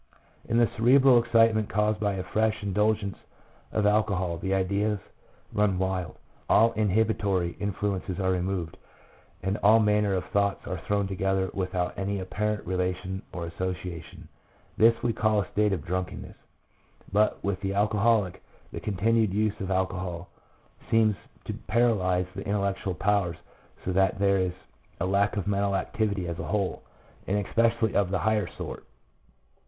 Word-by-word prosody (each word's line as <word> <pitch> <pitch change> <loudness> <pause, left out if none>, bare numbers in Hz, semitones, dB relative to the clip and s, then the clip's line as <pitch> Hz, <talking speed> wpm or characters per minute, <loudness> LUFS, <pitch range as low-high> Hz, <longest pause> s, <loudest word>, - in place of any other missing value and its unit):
In 115 - +2
the 120 -1 +5
cerebral 130 +2 +6
excitement 115 -2 +3
caused 105 +1 +1
by 105 -1 0
a 95 -1 -3
fresh 110 +3 0
in 100 -1 -2
dulgence 105 -1 0 0.5
of 105 - 0
alcohol 95 -5 +1
the 95 - -3
ideas 100 +2 +1 0.6
run 105 -3 +2
wild, 95 -2 -2 0.3
all 115 +1 +5
inhibitory 100 -4 +1
influences 100 -1 -2
are 95 -1 +1
removed, 90 -2 -2 0.7
and 95 +2 0
all 105 +2 +6
manner 105 -2 +2
of 90 - -2
thoughts 100 -1 0
are 90 -2 -4
thrown 100 -1 +1
together 95 0 -1
without 90 -1 -2
any 100 +1 -2
apparent 105 +3 -2
relation 90 +1 -2
or 85 -1 -5
association. 90 -1 -6 0.5
This 115 +1 +4
we 120 - +1
call 110 -1 +2
a - - -15
state 105 0 +2
of 85 -6 -2
drunkenness; 90 +1 -4 0.8
but 105 +1 +2
with 100 0 -2
the 100 -1 -2
alcoholic 105 -1 +2 0.3
the - - -5
continued 110 +1 +1
use 105 +1 0
of 95 - -4
alcohol 90 -2 -2 0.6
seems 110 -2 +4 0.3
to - - -4 0.2
paralyse 95 -6 +2
the - - -6
intellectual 100 -2 -1
powers 95 -3 +1 0.5
so 95 - -1
that 95 0 +2
there 100 0 +3
is 90 -1 0 0.5
a 90 - 0
lack 100 +2 +1
of 100 - -1
mental 100 -1 0
activity 100 -1 -1
as 85 -1 -4
a - - -4
whole, 100 -3 -1 0.5
and 100 +1 0
especially 115 0 +1
of 100 -3 +2
the 95 - 0
higher 110 -3 +1
sort. - - -7
100 Hz, 150 wpm, -27 LUFS, 95-105 Hz, 0.8 s, cerebral